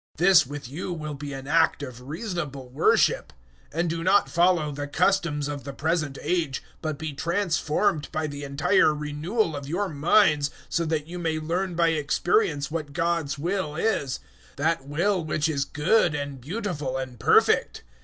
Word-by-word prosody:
This 175 -3 +6
with 145 -2 -7
you 165 +8 -5
will 155 -3 -4
be 145 0 -6
an 135 0 -7
act 160 -1 +3
of 125 -3 -8
reasonable 150 - -5
worship. 140 +6 +2 0.4
012:002 160 - -5
And 175 - 0
do 165 0 -2
not 190 +3 +4
follow 170 -3 +2
the 145 0 -5
customs 165 -3 +1
of 145 -1 -5
the 140 - -6
present 155 -1 -1
age, 165 -7 -1 0.2
but 155 -2 -3
be 155 0 -5
transformed 170 0 0
by 155 - -1
the 145 -1 -6
entire 140 +2 +3
renewal 155 +5 -1
of 140 -1 -6
your 190 +5 -1
minds, 150 -1 +3 0.2
so 170 - 0
that 155 -2 -1
you 175 +2 -7
may 160 -2 -1
learn 175 +3 -2
by 170 0 +3
experience 155 - +1
what 155 -3 -4
God's 165 -3 0
will 170 0 -2
is 165 -8 0 0.4
that 150 -1 0
will 175 +5 +1
which 155 0 0
is 140 -3 0
good 155 +3 +2
and 145 -2 -5
beautiful 150 - -3
and 130 -3 -6
perfect. - - +3
155 Hz, 170 wpm, -25 LUFS, 145-175 Hz, 0.4 s, This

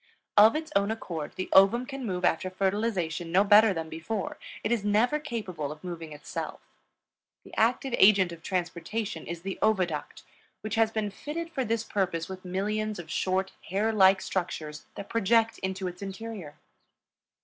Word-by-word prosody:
Of 215 +4 +7
its 315 0 -3
own 200 +1 +3
accord 170 -8 -4
the 185 - -3
ovum 200 +6 +6
can 275 0 -6
move 180 -5 -1
after 180 +3 +1
fertilization 185 -4 -1
no 190 +3 +5
better 210 +1 +7
than 165 -3 -3
before; 175 +6 -4 0.2
it 210 - -1
is 235 -4 +1
never 220 +8 +2
capable 185 - -4
of 150 +2 -10
moving 165 -3 -6
itself. 150 0 -6 0.8
The - - -15
active 245 +3 +1
agent 195 -3 +6
of 170 -1 -9
transportation 180 +1 -3
is 170 0 -6
the 195 0 -4
oviduct, 185 -8 0 0.4
which 215 -1 -5
has 225 -1 +3
been 215 -2 -2
fitted 330 +9 -5
for 270 -5 -1
this 230 -1 -1
purpose 185 -6 -1
with 190 -1 -8
millions 210 +3 -2
of 165 -2 -8
short, 190 +3 0 0.2
hair 210 +5 +1
like 190 -2 +6
structures 160 -5 -4
that 200 - -7
project 225 +1 +2
into 190 0 -3
its 180 +1 -7
interior. 195 -5 -7
195 Hz, 165 wpm, -28 LUFS, 175-220 Hz, 0.8 s, Of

